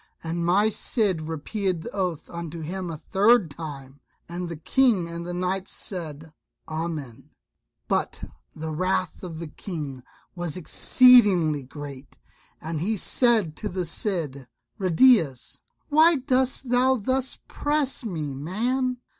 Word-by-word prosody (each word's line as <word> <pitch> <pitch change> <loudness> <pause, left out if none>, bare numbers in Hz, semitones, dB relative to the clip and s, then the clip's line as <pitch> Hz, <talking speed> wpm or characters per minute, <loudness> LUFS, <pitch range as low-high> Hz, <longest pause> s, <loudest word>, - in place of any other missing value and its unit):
And 170 +1 -3
my 195 +5 +3
Cid 205 -6 0
repeated 175 +2 -2
the - - -7
oath 180 -6 -3
unto 170 -1 -7
him 180 +3 -4
a 160 - -5
third 200 +1 +3
time, 140 -3 -8 0.3
and 175 +1 -5
the 170 - -5
King 190 - +2
and 170 +1 -6
the - - -4
knights 185 +1 -2
said 160 -4 -5 0.3
"Amen." 155 -7 -5 0.6
But - - -1 0.3
the 160 0 -5
wrath 185 +3 -1
of 170 -3 -6
the 165 - -5
King 150 -8 -6 0.3
was 175 -2 -4
exceedingly 185 - +5
great, 140 0 -10 0.4
and 160 -1 -4
he 215 +5 0
said 220 -7 +3
to 210 - -4
the 180 -1 -3
Cid, 160 - -2 0.3
"Ruydiez, 185 - +3 0.3
why 320 +3 +6
dost 260 -1 0
thou 255 +1 +4
thus 260 +3 -1
press 290 -3 0
me, 160 -10 -4
man? 245 - -1
175 Hz, 130 wpm, -25 LUFS, 155-220 Hz, 0.6 s, why